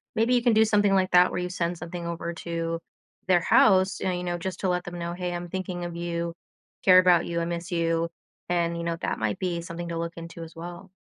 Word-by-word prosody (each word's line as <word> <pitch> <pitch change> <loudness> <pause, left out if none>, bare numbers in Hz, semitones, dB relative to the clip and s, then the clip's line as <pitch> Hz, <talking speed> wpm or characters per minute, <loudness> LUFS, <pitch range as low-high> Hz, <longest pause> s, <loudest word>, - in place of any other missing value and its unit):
maybe 230 +3 +2
you 240 - +2
can 240 - +4
do 220 +1 +5
something 205 -2 +3
like 185 -1 +2
that 180 0 +6
where - - -2
you 180 0 -2
send 175 -1 -2
something 175 0 -6
over 170 0 -4
to 165 0 -3 0.5
their 180 -2 +5
house, 190 +1 +4
and 185 -1 0
you 180 - -4
know, 175 -1 -2
just 185 +1 -5
to 190 - +1
let 180 0 0
them 175 0 -7
know, 170 0 -3
"Hey, 180 0 -3
I'm 175 0 -4
thinking 180 -1 -4
of 175 -1 -6
you, 170 0 -3 0.5
care 185 -1 +8
about 180 -2 +5
you, 170 0 -2
I - - -1
miss 170 +1 -4
you." 165 -1 +1 0.4
And, 170 -1 +1
you 170 - -4
know, 170 0 -1
that - - -2
might 110 -2 -1
be 175 -2 -1
something 170 0 -6
to 170 - -3
look 170 0 -3
into 165 0 -8
as 165 - -11
well. 175 +3 -8
175 Hz, 250 wpm, -26 LUFS, 170-185 Hz, 0.5 s, care